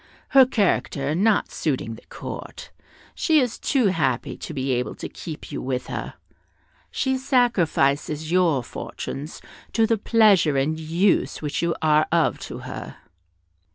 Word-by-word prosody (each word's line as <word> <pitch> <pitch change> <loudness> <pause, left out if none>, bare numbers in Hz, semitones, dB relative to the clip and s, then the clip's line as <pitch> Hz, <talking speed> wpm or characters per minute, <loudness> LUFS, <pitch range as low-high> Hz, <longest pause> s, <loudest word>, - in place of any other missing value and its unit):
Her 265 -2 +7
character 145 - 0
not 205 +5 +2
suiting 130 -6 -2
the 110 - -11
Court, - - -8 0.4
she 315 -2 +3
is 250 -4 -1
too 255 -7 +2
happy 135 -6 -1
to - - -8
be 135 -2 -2
able 125 0 -1
to - - -6
keep 160 -4 -8
you - - -4
with 130 -1 -2
her; - - -5 0.7
she 265 -1 -1
sacrifices 165 - +1
your 170 -8 +3
fortunes 145 +5 -7 0.3
to 225 - +3
the 225 -1 +1
pleasure 205 - +4
and 155 +4 0
use 170 +3 +1
which 150 - -2
you 170 -1 0
are 155 0 +4
of 170 -1 +2
to - - -7
her." - - -7
160 Hz, 145 wpm, -23 LUFS, 140-215 Hz, 0.7 s, Her